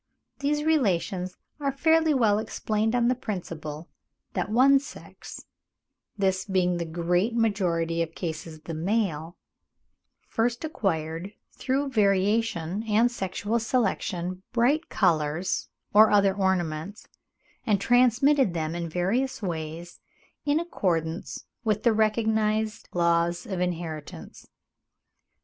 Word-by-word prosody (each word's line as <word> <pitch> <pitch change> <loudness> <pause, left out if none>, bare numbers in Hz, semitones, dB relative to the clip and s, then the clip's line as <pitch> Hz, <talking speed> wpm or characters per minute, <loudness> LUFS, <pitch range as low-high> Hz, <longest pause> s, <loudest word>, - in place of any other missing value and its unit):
These 295 +1 0
relations 190 - 0 0.2
are 280 -1 0
fairly 320 +3 +3
well 215 -5 +3
explained 220 +1 -1
on 240 -1 +3
the 250 - +4
principle 170 -9 -6 0.5
that - - -2
one 265 +5 +5
sex—this 195 -8 -7
being 185 -2 +1
in 175 - -1
the 170 - -2
great 175 +7 0
majority 175 -7 +1
of 165 0 -3
cases 160 -2 -5
the 165 - -7
male—first 195 - -4
acquired 170 - -2 0.2
through 275 +2 -1
variation 200 -4 +1
and 225 +3 +3
sexual 205 +1 -2
selection 185 -6 -1
bright 270 +7 +2
colours 165 -1 0 0.2
or 215 +1 +8
other 200 -2 +4
ornaments, 190 -1 -2 0.6
and 205 -3 +2
transmitted 250 -1 +3
them 160 -1 -2
in 170 -1 -4
various 195 +11 -1
ways, 165 -1 -5 0.5
in 290 +2 +3
accordance 170 - -2 0.2
with 215 -2 0
the 235 - +4
recognised 220 0 0
laws 170 0 +1
of 190 -3 -4
inheritance. 160 - -5
195 Hz, 110 wpm, -26 LUFS, 170-230 Hz, 0.6 s, or